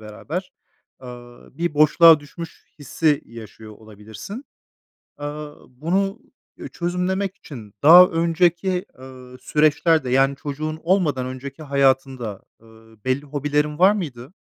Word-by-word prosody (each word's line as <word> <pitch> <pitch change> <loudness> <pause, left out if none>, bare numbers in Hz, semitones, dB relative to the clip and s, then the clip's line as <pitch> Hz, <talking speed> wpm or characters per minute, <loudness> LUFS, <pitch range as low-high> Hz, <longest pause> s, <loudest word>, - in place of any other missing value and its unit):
beraber, 160 - -7 0.5
ııı, 120 +1 -13
bir 170 -3 -2
boşluğa 155 +1 +6
düşmüş 165 +3 -11
hissi 150 +1 0
yaşıyor 110 -1 -12
olabilirsin. 110 - -11 0.7
Aaa, 145 0 -7 0.2
bunu, 190 - -2 0.4
üüü, - - -9
çözümlemek 180 +2 -2
için 110 -8 -12
daha 175 +4 +9
önceki, 175 +2 0
ııı, 130 -1 -13
süreçlerde, 155 -1 +1
yani 135 +2 +2
çocuğun 155 +2 -5
olmadan 165 -8 +1
önceki 130 +4 -8
hayatında, 135 -6 0 0.2
ııı, 110 0 -20
belli 130 +2 0
hobilerin 150 +2 -2
var 190 +2 +6
mıydı? 145 - -6
145 Hz, 110 wpm, -21 LUFS, 125-170 Hz, 0.7 s, daha